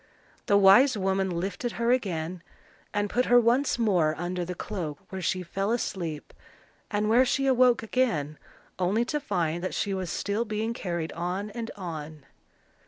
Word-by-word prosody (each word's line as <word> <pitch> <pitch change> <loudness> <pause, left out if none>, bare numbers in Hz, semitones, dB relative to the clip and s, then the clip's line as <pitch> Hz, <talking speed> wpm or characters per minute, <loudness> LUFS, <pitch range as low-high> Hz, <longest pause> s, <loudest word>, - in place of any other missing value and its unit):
The 200 - +5
wise 205 +6 +6
woman 190 0 0
lifted 185 +7 -3
her 235 +1 +1
again, 180 -8 -1 0.5
and 205 0 0
put 250 +5 +1
her 245 0 +6
once 245 +4 +2
more 180 -9 +2
under 175 +1 -3
the 180 +1 -5
cloak, 170 -7 -5
where 190 0 -5
she 185 +1 -1
fell 195 +3 -2
asleep, 170 -10 -3 0.6
and 210 0 0
where 235 +4 +5
she 270 +1 0
awoke 255 -3 +4
again 215 - 0 0.4
only 200 +6 +1
to 300 +4 -1
find 175 - -1
that 185 - -3
she 200 - -1
was 185 -2 -3
still 205 +3 -1
being 220 0 -2
carried 170 -7 -3
on 185 +5 -3
and 230 +1 -5
on. 155 -5 -7
195 Hz, 165 wpm, -27 LUFS, 175-230 Hz, 0.6 s, wise